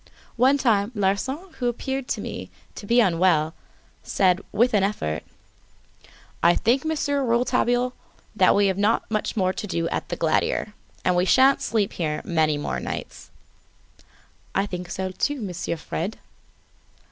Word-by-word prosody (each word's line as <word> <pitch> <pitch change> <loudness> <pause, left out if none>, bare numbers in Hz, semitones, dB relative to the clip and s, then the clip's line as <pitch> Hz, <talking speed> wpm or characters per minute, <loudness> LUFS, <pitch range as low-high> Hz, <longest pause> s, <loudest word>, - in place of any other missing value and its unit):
At - - -27 0.2
one 260 +4 +4
time, 220 -5 +2
Larsan, 260 - -1
who 245 - 0
appeared 265 +2 -3
to - - -2
me - - -6 0.2
to 205 - -9
be 235 +3 +4
unwell, 170 -6 +3 0.5
said, 185 -1 +2
with 235 +4 +2
an 205 - +4
effort: 135 - -1 1.2
"I 170 +1 +5
think, 245 +4 +2
Monsieur 285 -3 0
Rouletabille, 245 +1 +1 0.4
that - - +5
we've 200 -2 +2
not 215 +3 +2
much 215 +1 -2
more 185 -2 +2
to 215 0 -5
do 170 -3 -1
at - - -3
the - - -2
Glandier, 210 - 0 0.3
and 180 - +3
that - - 0
we 180 - +3
sha'n't 265 +6 +5
sleep 215 -4 0
here 155 -3 -2
many 155 -3 +1
more 145 - -3
nights." - - -6 1.3
"I 195 - +2
think 180 -3 -6
so, 190 0 -3
too, 285 +10 -1
Monsieur 180 -5 -4
Fred." 175 +6 -4
205 Hz, 155 wpm, -24 LUFS, 180-245 Hz, 1.3 s, I